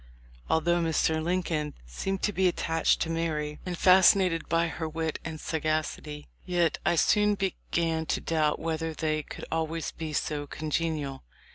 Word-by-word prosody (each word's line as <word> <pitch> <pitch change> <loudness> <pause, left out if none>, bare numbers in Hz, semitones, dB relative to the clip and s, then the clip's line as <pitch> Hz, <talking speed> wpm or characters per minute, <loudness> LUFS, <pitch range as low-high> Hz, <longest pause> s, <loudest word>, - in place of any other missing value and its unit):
Although 170 +2 +2
Mr. 160 -1 +1
Lincoln 165 -3 -1
seemed 190 - -3
to 210 - +1
be 190 0 +3
attached 165 -2 +1
to 165 - 0
Mary, 155 -2 -2
and 175 -1 -3
fascinated 185 -2 +5
by 165 +1 +2
her 160 -1 -4
wit 160 0 -3
and 160 -2 -6
sagacity, 155 -1 -2 0.2
yet 175 -3 +1
I - - +2
soon 210 +4 +3
began 170 -4 -1
to - - 0
doubt 155 -2 +1
whether 160 0 -3
they 155 0 0
could - - -9
always 160 0 -2
be 160 -1 -6
so 145 0 -2
congenial. 155 - -2
160 Hz, 150 wpm, -28 LUFS, 155-170 Hz, 0.2 s, fascinated